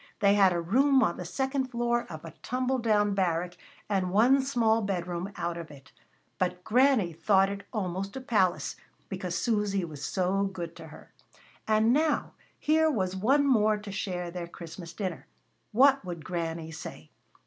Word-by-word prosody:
They 200 -1 +5
had 195 -2 +5
a 175 - 0
room 265 +10 +3
on 170 - 0
the 180 - -6
second 265 +8 -1
floor 240 -1 0
of 155 0 -8
a 165 - -8
tumble 255 +1 -1
down 210 -3 +2
barrack, 180 -2 0 0.3
and 190 -3 0
one 240 +8 +4
small 230 -4 +2
bedroom 180 -1 -3
out 170 0 -3
of 165 - -8
it; 135 -2 -15 0.5
but 180 0 -1
Granny 245 -6 +3
thought 195 +4 +3
it 200 0 -7
almost 195 -1 -3
a 265 - -5
palace, 205 -8 +1 0.3
because - - -4
Susy 205 -5 0
was 150 -3 -9
so 190 +4 0
good 175 -4 -5
to - - -10
her. - - -14 0.5
And 220 +2 +4
now 310 +2 +1 0.2
here 315 +1 +3
was 190 -9 -1
one 270 +9 +3
more 215 -5 +3
to 210 -1 -8
share 180 -3 -3
their 175 -1 -5
Christmas 170 0 -9
dinner. 180 -2 -5 0.4
What 270 +3 +5
would 170 -4 -7
Granny 165 -2 -3
say! 80 - -9
195 Hz, 170 wpm, -28 LUFS, 175-235 Hz, 0.5 s, They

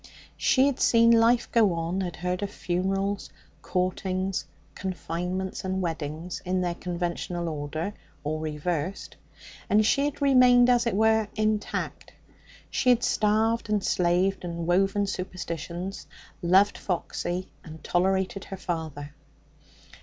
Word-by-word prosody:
She 260 0 +3
had 280 -2 0
seen 230 0 +5
life 230 +1 +4
go 215 -6 +4
on, 170 +3 -2
had 175 -3 -3
heard 180 +1 -2
of 200 - -2
funerals, 195 +2 -2 0.3
courtings, 185 +1 -1 0.3
confinements 185 0 -4
and 190 0 -1
weddings 165 0 -4
in 185 0 0
their 175 -1 0
conventional 175 0 -3
order 155 +5 -3 0.3
or 155 +1 -2
reversed 155 +3 -3 0.5
and 215 +1 +4
she 280 +6 +3
had 290 - -3
remained, 250 -3 +6
as 240 -1 +3
it 230 - 0
were, 220 0 +3
intact. 215 -1 -2 0.6
She 255 - +1
had 245 -1 +4
starved 220 +2 +1
and 210 -2 +1
slaved 180 +2 +1
and 170 -1 -4
woven 195 +3 +2
superstitions, 180 -1 -5 0.3
loved 190 +3 +4
Foxy, 180 0 -3
and 160 -1 -11
tolerated 190 +2 0
her 195 - -7
father. 155 -5 -5
185 Hz, 125 wpm, -27 LUFS, 175-210 Hz, 0.6 s, remained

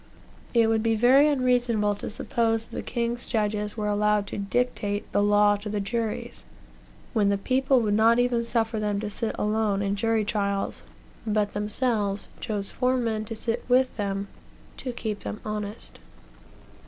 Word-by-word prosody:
It 230 -1 +6
would 225 0 +2
be 225 0 +2
very 255 +6 +6
unreasonable 245 -6 +2
to - - -5
suppose 225 0 0
that - - -12
the - - -2
king's 235 0 -2
judges 210 -1 -1
were 210 - -2
allowed 210 0 +2
to - - -5
dictate 205 -1 -1
the 205 - +2
law 205 0 +4
to 205 +1 -7
the 210 0 -1
juries, 220 +2 -3 0.7
when 210 -4 +3
the 200 - +2
people 260 +4 +2
would 210 -2 +1
not 225 +2 +5
even 245 -1 +2
suffer 230 -1 0
them 210 -1 -1
to 210 -1 -4
sit 225 +2 -2
alone 210 -2 +1
in 200 0 0
jury 225 +1 +1
trials, 200 -2 -1 0.5
but 210 -1 +1
themselves 210 -1 -1
chose 205 -4 -3
four 255 0 +1
men 220 -3 -1
to 225 - -5
sit 230 +2 -2
with 255 +1 +3
them, 200 -1 -2 0.5
to 255 - -4
keep 220 -3 -4
them 215 - -6
honest. 210 0 -5
215 Hz, 165 wpm, -26 LUFS, 205-235 Hz, 0.7 s, It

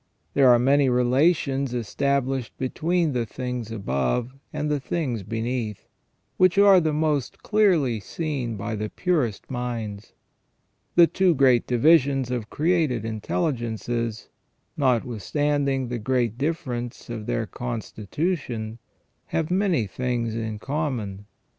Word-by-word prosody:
There 135 -2 +5
are 120 - +7
many 135 +2 +3
relations 135 +1 +2
established 135 +1 -1
between 160 +4 0
the 120 -2 0
things 125 -1 -5
above 95 - -1 0.2
and 150 0 -2
the 150 -1 0
things 130 -5 -2
beneath, 115 +1 -3 0.5
which 185 0 +4
are 200 -2 +7
the 160 -2 +1
most 150 -4 -1
clearly 175 - +3
seen 135 -2 -3
by 115 +3 -4
the 105 0 -3
purest 145 - -1
minds. 115 -5 -4 0.8
The 175 - +8
two 180 0 +2
great 130 -3 +4
divisions 135 -1 +3
of 120 -4 -3
created 155 - +1
intelligences, 115 - -2 0.5
notwithstanding 135 +2 0
the 120 -1 -3
great 120 -1 0
difference 125 -4 -3
of 110 -3 -6
their 115 - 0
constitution, 115 - -4 0.5
have 160 +1 -1
many 185 - +2
things 120 +2 -2
in 110 -1 -3
common. 115 -8 -3
125 Hz, 115 wpm, -25 LUFS, 115-150 Hz, 0.8 s, The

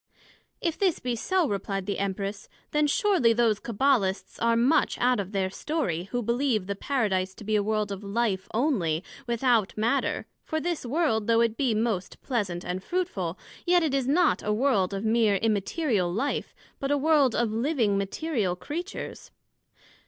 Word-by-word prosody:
If 335 -2 -1
this 380 -5 +2
be 250 -1 -2
so, 365 +8 +1
replied 195 -2 -3
the 200 - -2
Empress, 200 +1 -3 0.2
then 300 0 +2
surely 360 - +3
those 225 -3 +2
Cabbalists 230 -4 0
are 230 0 +3
much 255 +7 +3
out 250 -2 +2
of 195 -1 -4
their 190 -2 -1
story, 195 - -2
who 240 +5 -3
believe 235 -3 +1
the 200 +1 -3
Paradise 195 -6 -1
to - - -11
be 215 +1 0
a 210 - +3
world 210 0 -1
of 200 +1 -5
Life 200 -2 -1
onely, 195 - +1 0.2
without 235 -4 +1
Matter, 235 +6 0 0.2
for 315 - -2
this 335 -5 -3
world, 240 -7 +1
though 230 0 +4
it 230 -1 +2
be 245 -4 +1
most 215 -5 -1
pleasant 200 -9 -2
and 185 +1 -3
fruitful, 200 - -2 0.3
yet 350 0 +4
it 305 -4 0
is 270 -2 +1
not 315 +3 +3
a 210 - -1
world 210 -5 +2
of 195 +3 -3
meer 220 -2 +3
Immaterial 210 - 0
life, 250 +10 -2 0.2
but 275 - -2
a 290 - +3
world 285 -4 +3
of 235 -2 +1
living, 230 -3 +1
Material 200 - -1
Creatures. 340 - -6
230 Hz, 170 wpm, -27 LUFS, 200-280 Hz, 0.3 s, though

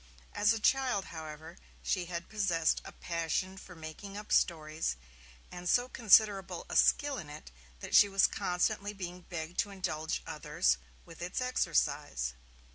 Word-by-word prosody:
As 210 +1 +3
a 225 - 0
child, 250 -4 +2
however, 160 +1 -8 0.2
she 185 -3 0
had 170 -1 -5
possessed 180 -7 +1
a - - -9
passion 170 +3 -2
for 185 -1 -11
making 165 +5 -8
up 210 0 -8
stories, 155 - +1 0.6
and 175 0 -5
so 245 0 +3
considerable 210 -5 +4
a - - -4
skill 285 -2 +3
in 155 - -9
it 145 - -10 0.3
that - - -7
she 205 - +8
was 195 0 +4
constantly 185 +3 0
being 180 -2 -7
begged 170 -1 -6
to 205 - +2
indulge 160 -5 -3
others - - 0 0.3
with 165 - -13
its 175 +7 -3
exercise. 145 - 0
180 Hz, 150 wpm, -32 LUFS, 160-205 Hz, 0.6 s, she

